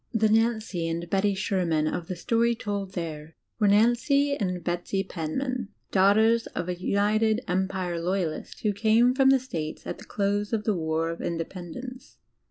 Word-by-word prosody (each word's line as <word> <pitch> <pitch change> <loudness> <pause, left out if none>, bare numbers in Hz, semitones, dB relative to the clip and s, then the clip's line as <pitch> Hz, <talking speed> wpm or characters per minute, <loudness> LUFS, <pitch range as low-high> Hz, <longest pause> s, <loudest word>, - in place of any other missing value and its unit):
The 220 -1 +3
Nancy 220 -6 +1
and 170 +1 -3
Betty 195 0 +2
Sherman 180 -6 0
of 165 +1 -3
the 185 - -4
story 230 +6 +1
told 200 -4 -4
there 160 -3 -6 0.2
were 210 - +4
Nancy 240 +7 +3
and 180 -7 -2
Betsy 175 +3 -1
Penman, 235 - -3 0.2
daughters 220 +4 +4
of 170 - -4
a 180 - -1
United 210 +5 +1
Empire 185 -2 -1
Loyalist 175 -3 -2
who 210 -2 +1
came 225 +4 +4
from 265 0 +4
the 270 - +7
DigilizedbyGOOgle 265 - 0
States 160 -11 -5
at - - -5
the - - -11
close 205 +1 -1
of 215 -2 0
the 215 - +1
war 160 0 -1
of 165 - -7
Independence. 180 +9 -6
200 Hz, 170 wpm, -26 LUFS, 175-225 Hz, 0.2 s, the